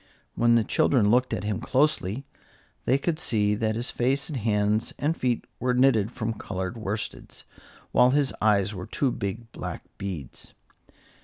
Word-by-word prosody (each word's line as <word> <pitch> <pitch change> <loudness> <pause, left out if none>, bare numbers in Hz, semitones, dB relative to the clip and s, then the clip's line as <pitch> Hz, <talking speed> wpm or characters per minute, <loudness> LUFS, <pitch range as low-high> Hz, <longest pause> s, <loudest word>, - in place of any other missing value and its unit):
When 120 0 +4
the 115 - +4
children 105 -1 +3
looked 125 +2 +3
at - - -2
him 105 -2 -1
closely, 135 - +1 0.6
they 130 - +4
could 155 +3 -1
see 105 -8 +1
that 110 +1 0
his 120 +2 -1
face 135 +3 0
and 150 - -3
hands 105 0 +1
and 150 +5 0
feet 125 -5 -1
were 125 0 +1
knitted 125 -5 +4
from 115 -2 -2
colored 95 -1 -4
worsteds, 110 -1 -5 0.5
while 125 - +5
his 140 0 +2
eyes 105 -1 +3
were 90 -2 -6
two 135 -3 0
big 115 +2 -5
black - - -6 0.2
beads. 85 -10 -6
115 Hz, 160 wpm, -26 LUFS, 105-130 Hz, 0.6 s, while